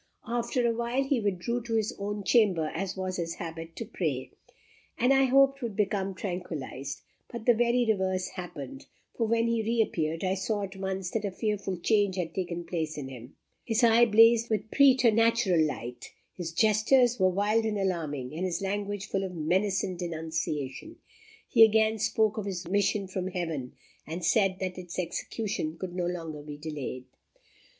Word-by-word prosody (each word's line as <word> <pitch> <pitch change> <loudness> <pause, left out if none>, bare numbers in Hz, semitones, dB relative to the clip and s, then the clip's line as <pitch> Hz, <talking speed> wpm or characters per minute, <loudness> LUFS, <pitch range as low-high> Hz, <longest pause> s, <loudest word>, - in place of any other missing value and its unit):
After 240 +1 -1
awhile, 235 +3 0
he 270 -2 +1
withdrew 205 +4 -1
to 225 -1 -3
his 220 -1 0
own 205 0 -3
chamber, 185 -8 +3
as 190 +2 -3
was 185 -1 -3
his 165 -1 -3
habit, 165 0 -7
to 230 - -5
pray, 155 - -3 0.7
and 250 +3 +4
I 270 0 +5
hoped 275 +1 +4
would 230 -4 -4
become 195 -2 0
tranquillized; 160 -8 -5 0.3
but 235 -2 -7
the 240 - +6
very 240 +1 +2
reverse 190 -3 0
happened, 145 -7 -8 0.3
for 230 - 0
when 230 +1 +2
he 230 -1 +1
reappeared, 205 -8 0
I 185 0 +1
saw 205 +2 -1
at 195 0 -6
once 190 -1 -3
that 225 - -1
a 200 - -1
fearful 200 -1 -2
change 205 +1 +2
had 170 -3 -3
taken 175 -2 -3
place 160 -3 -3
in 135 -2 -5
him. 125 0 -11 0.3
His 230 +1 0
eye 235 +1 +6
blazed 230 +1 +6
with 215 0 -2
preternatural 230 - +4
light, 125 -5 -5 0.2
his 170 -3 -5
gestures 220 +6 +3
were 185 0 +5
wild 205 +4 +1
and 220 -1 -1
alarming, 155 -9 -2
and 165 +4 -4
his 185 -2 -1
language 200 0 -3
full 195 - -2
of 185 -2 -5
menace 185 +5 +1
and 180 -2 -4
denunciation. 160 - -4 0.5
He 225 - +7
again 220 0 +4
spoke 220 0 +1
of 205 - -4
his 180 -3 -4
mission 200 +1 +1
from 185 0 -3
Heaven, 165 -9 -4 0.3
and 165 +2 -4
said 195 +1 +3
that 185 -1 -3
its 175 -1 -8
execution 180 -2 -3
could 185 -1 -5
no 175 -1 -1
longer 165 -4 -5
be 145 0 -8
delayed." 145 -4 -5
195 Hz, 175 wpm, -28 LUFS, 170-225 Hz, 0.7 s, He